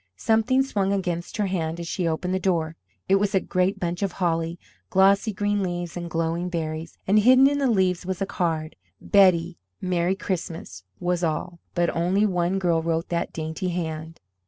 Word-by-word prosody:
Something 225 - +2
swung 200 -7 -1
against 180 -2 -2
her 210 - +1
hand 170 -3 -2
as 170 - -5
she 175 0 -1
opened 165 +3 -1
the 190 - +1
door. 165 -4 0 0.3
It 195 - +5
was 200 0 0
a - - +5
great 185 +1 0
bunch 175 +1 -2
of 195 -3 -1
holly, 165 -2 -1 0.3
glossy 195 +3 +4
green 205 0 0
leaves 175 -2 -3
and 175 -1 -5
glowing 165 +1 -1
berries, 160 -1 -4
and 205 +2 +4
hidden 255 +5 +7
in 285 0 +1
the 275 -2 +2
leaves 185 -5 +2 0.2
a 195 - 0
card: 165 -5 -2 0.2
"Betty, 180 -3 +3 0.2
Merry 180 0 0
Christmas," 170 - -5 0.2
was 175 0 -1
all, 170 +2 -2 0.2
but 175 -1 +1
only 180 +5 +2
one 180 -1 0
girl 170 -3 +1
wrote 165 +1 -1
that 170 -1 -1
dainty 160 +4 -3
hand. 160 -2 -4
180 Hz, 180 wpm, -25 LUFS, 165-195 Hz, 0.3 s, hidden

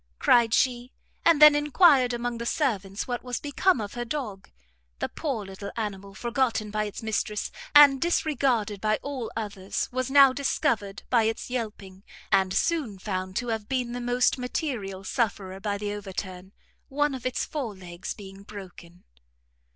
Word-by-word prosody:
cried 235 - +4
she 245 0 +1 0.3
and 330 -3 +5
then 300 0 +10
enquired 295 -3 +4
among 240 0 -3
the 235 - -4
servants 205 - -1
what 245 -1 -3
was 250 -1 -3
become 290 +2 +1
of 205 -2 -5
her 240 - -3
dog. 235 -7 -5 0.5
The - - -2
poor 265 -10 -3
little 195 +1 -7
animal, 200 -3 -5
forgotten 235 -2 -1
by 215 0 -1
its 205 +2 -7
mistress, 210 -1 -2 0.2
and 285 -2 +8
disregarded 265 - +1
by 215 0 +2
all 265 -5 -4
others, 200 -3 -3
was 255 0 -2
now 275 -1 +7
discovered 220 -7 -1
by 235 -3 +4
its 225 +2 -3
yelping; 210 -6 -5 0.3
and 190 -2 +3
soon 240 - 0
found 185 -1 -4
to 245 +2 -2
have 220 -2 -3
been 250 -2 -1
the 245 0 -4
most 245 +2 +2
material 240 - -3
sufferer 195 -4 -2
by 205 0 -2
the 205 0 -3
overturn, 190 -2 -6 0.4
one 290 +1 +1
of 260 - -6
its 255 - -2
fore 255 -9 -4
legs 175 -1 -7
being 195 -1 -11
broken. 185 -4 -12
225 Hz, 160 wpm, -26 LUFS, 200-260 Hz, 0.5 s, then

